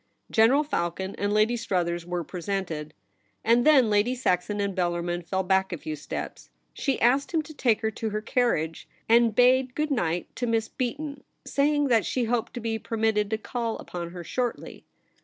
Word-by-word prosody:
General 240 +7 +5
Falcon 190 - -2
and 205 0 0
Lady 215 +3 +3
Struthers 175 -6 -1
were 175 -1 -2
presented; 175 -3 -4 0.5
and 235 +4 +4
then 265 -8 +6
Lady 210 +5 +2
Saxon 205 -3 0
and 200 -1 -1
Bellarmin 175 -1 -1
fell 190 +3 -1
back 190 +1 +2
a 175 - -3
few 155 0 -5
steps. 150 - -6 0.2
She 275 -3 -1
asked 265 +4 +3
him 325 -2 +1
to 310 - -11
take 240 -7 +1
her 220 -1 0
to 220 +1 -3
her 210 0 -2
carriage, 215 - -1 0.2
and 230 -1 +4
bade 255 +1 +4
good 305 0 -1
night 175 -9 -1
to 245 - -1
Miss 225 -1 +1
Beaton, 280 +2 -4 0.2
saying 290 0 +2
that 230 -3 +4
she 255 - 0
hoped 235 +1 -1
to - - -3
be 225 -1 -2
per 225 - -5
mitted 215 -2 +1
to 220 - 0
call 230 +1 -3
upon 170 -1 -6
her 175 0 -8
shortly. 245 +7 -4
220 Hz, 185 wpm, -26 LUFS, 180-245 Hz, 0.5 s, then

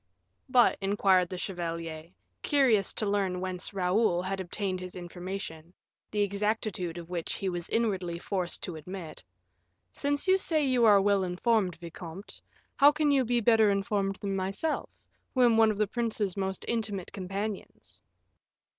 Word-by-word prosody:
"But," 250 -1 +4
inquired 195 -2 +3
the 185 - -5
chevalier, 165 -3 -5 0.3
curious 245 -9 +3
to 215 - -2
learn 195 -3 0
whence 185 -1 -3
Raoul 185 -1 +1
had 195 +1 -3
obtained 185 +1 -3
his 185 0 -8
information, 175 -1 -7 0.3
the 210 - -1
exactitude 200 -3 -2
of 170 -1 -8
which 170 -2 -2
he 195 - -2
was 175 -1 -4
inwardly 190 -7 0
forced 180 0 -3
to 175 - -4
admit, 175 +1 -8 0.7
"since 285 +4 -1
you 380 +1 +5
say 310 -5 +1
you 255 -3 +3
are 205 -2 +7
well 200 -1 +3
informed, 185 0 +1
vicomte, 170 +2 -9 0.4
how 285 +1 +8
can 300 -1 +1
you 275 -2 +4
be 240 0 +1
better 220 -1 +5
informed 200 -1 0
than 195 0 -3
myself, 195 +12 -2 0.5
who 255 - +4
am 235 -2 +5
one 225 0 +5
of 215 - -1
the 210 - +2
prince's 215 -3 -2
most 190 -1 -3
intimate 210 -5 -2
companions?" 195 +2 -6
195 Hz, 155 wpm, -29 LUFS, 180-220 Hz, 0.7 s, how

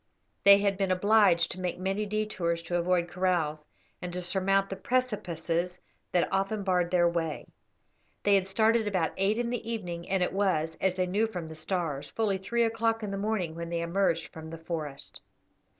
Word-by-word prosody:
They 200 0 +10
had 200 -1 0
been 195 -1 +1
obliged 185 -2 +4
to 185 - -7
make 180 -1 -2
many 195 +3 -1
detours 190 -6 -1
to 175 +1 -1
avoid 175 0 +1
kraals, 175 -4 0 0.4
and 180 - -4
to 180 - -2
surmount 195 +2 +1
the - - -2
precipices 180 -7 -1 0.3
that 175 - +2
often 195 +2 0
barred 180 -2 +1
their 175 -1 +4
way. 165 -2 -2 0.8
They 205 - +4
had 195 -1 +3
started 220 +2 +2
about 185 -5 0
eight 195 +3 +1
in 240 0 -1
the 245 - -2
evening, 175 -6 -5
and 190 -2 +2
it 180 - -1
was, 165 -5 +1
as 190 -1 +2
they 185 - +1
knew 205 +5 +1
from 180 -6 -5
the 160 - -8
stars, 155 -3 -3
fully 205 -4 0
three 235 +5 0
o'clock 225 0 0
in 205 - -3
the - - -2
morning 195 -5 -1
when 170 0 -6
they 170 -1 -1
emerged 170 -1 0
from 160 0 -8
the 165 - -7
forest. 155 -4 -6
185 Hz, 190 wpm, -29 LUFS, 170-205 Hz, 0.8 s, They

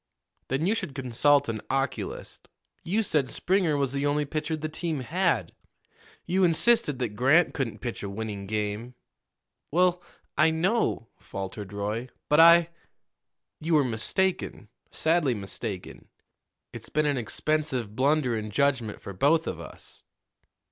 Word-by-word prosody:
Then 135 +5 0
you 200 - +3
should 145 - -4
consult 140 +2 +3
an 110 -2 -3
oculist. 135 +1 -3 0.3
You 210 +6 +1
said 150 -9 +1
Springer 180 -5 +1
was 140 -2 0
the 140 +1 0
only 145 +1 +1
pitcher 155 +2 -2
the 155 0 -3
team 155 -2 -3
had; 155 - 0 0.7
you 185 +2 +1
insisted 170 - +3
that 125 -3 -1
Grant 140 +9 +4
couldn't 135 -6 -3
pitch 120 -2 -4
a 100 - -4
winning 100 -1 -5
game." 105 +3 -3 0.7
"Well, 180 +2 +2 0.3
I 155 +1 +5
know," 165 - 0
faltered 100 +1 -6
Roy; 105 +5 -3 0.2
"but 150 - +4
I 170 0 +7 0.4
" - - -59
"You 160 +1 +1
were 150 - +5
mistaken 135 - -1 0.2
sadly 160 -6 +1
mistaken. 100 -1 -6 0.7
It's - - -9
been 155 +1 +1
an 145 -2 +1
expensive 125 -2 -1
blunder 135 -1 +2
in 110 -1 -4
judgment 125 -2 0
for 100 - -7
both 155 - +3
of 85 - -4
us." 85 - -10
140 Hz, 140 wpm, -27 LUFS, 110-160 Hz, 0.7 s, I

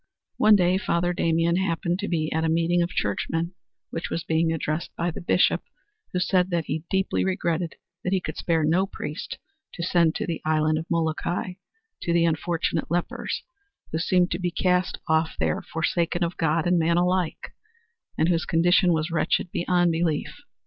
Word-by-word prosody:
One 215 0 +6
day 185 -1 +3
Father 175 -3 0
Damien 165 0 +2
happened 175 -1 0
to 205 - -2
be 155 -3 -1
at 160 +1 0
a 160 - +1
meeting 170 +2 +2
of 170 - 0
churchmen 165 - -1 0.4
which 165 - -4
was 165 - -2
being 160 0 +1
addressed 155 0 -2
by 170 +1 -1
the - - -7
Bishop 175 +1 +3 0.5
who - - -2
said 180 0 +2
that 170 -3 -1
he 155 +3 -3
deeply 190 0 +1
regretted 175 -3 -1 0.3
that 180 - -1
he 190 - +2
could - - -6
spare 165 -2 0
no 175 +6 +2
priest 150 -3 -6 0.4
to 170 - -4
send 170 -2 +3
to - - -2
the 170 - -3
Island 155 0 +2
of 160 - -7
Molokai 170 +2 -1 0.5
to 170 - 0
the 170 0 +4
unfortunate 165 0 -1
lepers, 175 +1 -2 0.5
who 160 - -1
seemed 180 +1 +2
to 175 - -1
be 180 -1 0
cast 180 +1 +1
off 160 0 +1
there - - 0
forsaken 170 +1 -1
of 170 +1 -2
God 160 -3 +1
and 175 0 +3
man 170 +1 +2
alike 180 -1 0 0.7
and 160 - +3
whose 170 -2 +1
condition 175 +2 +4
was 160 +1 -1
wretched 170 +1 0
beyond 175 0 +2
belief. 165 -2 -1
170 Hz, 180 wpm, -25 LUFS, 160-180 Hz, 0.7 s, One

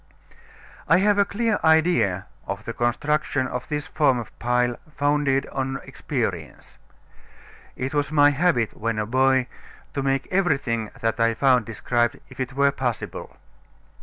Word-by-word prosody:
I - - +5
have 205 +2 +3
a 200 - +5
clear 220 +1 0
idea 160 - +3 0.2
of 100 +2 -5
the 115 - -4
construction 135 +3 0
of 125 -1 -5
this 150 0 -3
form 145 -6 +2
of 120 - -7
pile, 120 0 +1 0.2
founded 145 -2 +1
on 135 0 -2
experience. - - -5 1.0
It 130 +3 -4
was 145 0 0
my 145 -1 +5
habit 145 -6 +1
when 115 0 -2
a 105 - -1
boy 130 +2 +3 0.5
to 140 - -2
make 135 0 0
everything 140 - 0
that 115 0 -1
I 115 0 +2
found 125 -3 +3
described, 120 +1 0
if - - -13
it 130 0 -3
were 140 +1 +3
possible. 125 -5 -4
135 Hz, 145 wpm, -24 LUFS, 120-150 Hz, 1.0 s, I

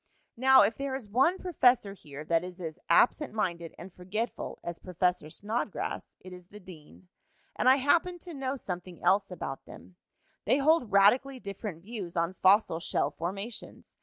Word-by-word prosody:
"Now, 265 0 +7
if 210 +3 0
there 275 -1 -3
is 260 -5 -6
one 270 - +3
professor 250 - +2
here 150 -5 -10
that 165 +1 +1
is 180 0 -9
as 160 -3 -6
absent 235 - +3
minded 170 -6 -2
and 175 +1 -11
forgetful 200 +5 -4
as 170 -1 -6
Professor 180 -3 -1
Snodgrass, 210 +4 -4
it 185 0 -11
is 180 -1 -12
the 210 +2 -13
dean. 180 -1 -15 0.5
And 255 - +3
I 260 - +7
happened 330 +6 +1
to 350 - -8
know 270 -1 -3
something 180 -7 -7
else 195 +1 +3
about 155 -7 -6
them. 180 - -14 0.5
They - - +3
hold 290 -5 +2
radically 245 +7 +4
different 200 -5 -7
views 195 -6 -7
on 170 +2 0
fossil 190 -3 +3
shell 145 -3 -1
formations. 195 +9 -7
200 Hz, 165 wpm, -29 LUFS, 175-255 Hz, 0.5 s, Now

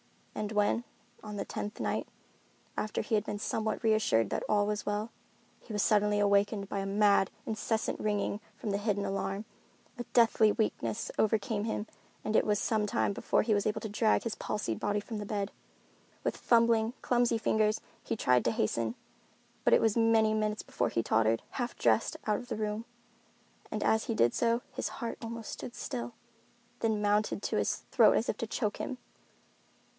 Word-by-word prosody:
And 210 0 -3
when—on 210 0 -2
the 200 - -3
tenth 210 - -5
night, - - -1 0.7
after 215 - -1
he - - -5
had 210 - +3
been 205 - -4
somewhat 220 +2 -2
reassured 215 - +3
that - - -1
all 205 -1 +3
was 210 0 -2
well—he 210 +2 -7
was 210 -2 +1
suddenly 210 -1 +3
awakened 200 0 +2
by 200 - -3
a 195 - -2
mad, 200 -1 +4 0.2
incessant 220 0 -1
ringing 205 -1 -1 0.2
from 215 - -3
the 200 - 0
hidden 205 -1 0
alarm, 195 +1 -2 0.5
a - - -2
deathly 220 -2 +4
weakness 115 - -1
overcame 215 0 +1
him 220 -1 -2 0.4
and 215 - -1
it - - +4
was 210 -1 +3
some 210 0 0
time 200 - +1
before - - +1
he 220 0 +2
was 205 0 +1
able 215 0 -1
to 220 - -4
drag 215 +1 +2
his 230 - -2
palsied 115 - -3
body 205 0 0
from 210 +1 -6
the 205 - -4
bed. 205 -2 -2 0.7
With - - 0
fumbling, 230 -1 +3
clumsy 240 -1 +2
fingers 215 -1 +2 0.2
he - - -2
tried 125 - +3
to 115 - +3
hasten, 115 +1 -1 0.7
but - - +4
it - - +3
was 220 -2 +2
many 225 -1 +4
minutes 215 0 -1
before - - -1
he 115 - 0
tottered, 110 +1 +2
half 245 -2 -3
dressed, 225 - +2
out 210 -1 +2
of 245 - -10
the - - -3
room. 215 +1 -2 0.8
And - - -2
as 220 0 +2
he 230 - -2
did 120 - +3
so, 235 +1 +1
his - - -3
heart 235 - -5
almost 230 -1 -6
stood 240 - -7
still, 120 0 -5 0.6
then 220 -2 0
mounted 210 +1 +1
to - - 0
his - - +1 0.2
throat - - +6
as - - +1
if - - -1
to - - -3
choke 210 -4 -1
him. 255 - -4
210 Hz, 180 wpm, -31 LUFS, 205-220 Hz, 0.8 s, throat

